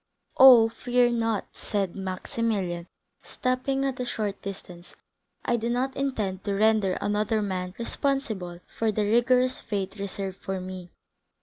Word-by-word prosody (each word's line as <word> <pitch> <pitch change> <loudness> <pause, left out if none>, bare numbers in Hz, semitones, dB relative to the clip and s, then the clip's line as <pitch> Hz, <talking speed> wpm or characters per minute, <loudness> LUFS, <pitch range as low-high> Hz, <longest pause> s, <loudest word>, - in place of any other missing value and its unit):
"Oh, 250 -4 +10
fear 245 +1 +1
not," 225 -3 0
said 195 -4 -2
Maximilian, 190 -2 -2 0.3
stopping 260 +2 -1
at 265 -2 -2
a - - 0
short 210 -4 -3
distance, 180 -3 -9 0.5
"I 240 - +2
do 230 +1 -2
not 255 +2 -1
intend 215 -9 -2
to 200 -1 0
render 215 -2 +3
another 210 +2 0
man 185 -3 -3
responsible 225 -9 -2
for 225 -1 -1
the 210 0 0
rigorous 250 +3 +3
fate 195 -1 -3
reserved 195 -1 -4
for 190 -1 -4
me. 185 -1 -7
215 Hz, 135 wpm, -26 LUFS, 190-240 Hz, 0.5 s, Oh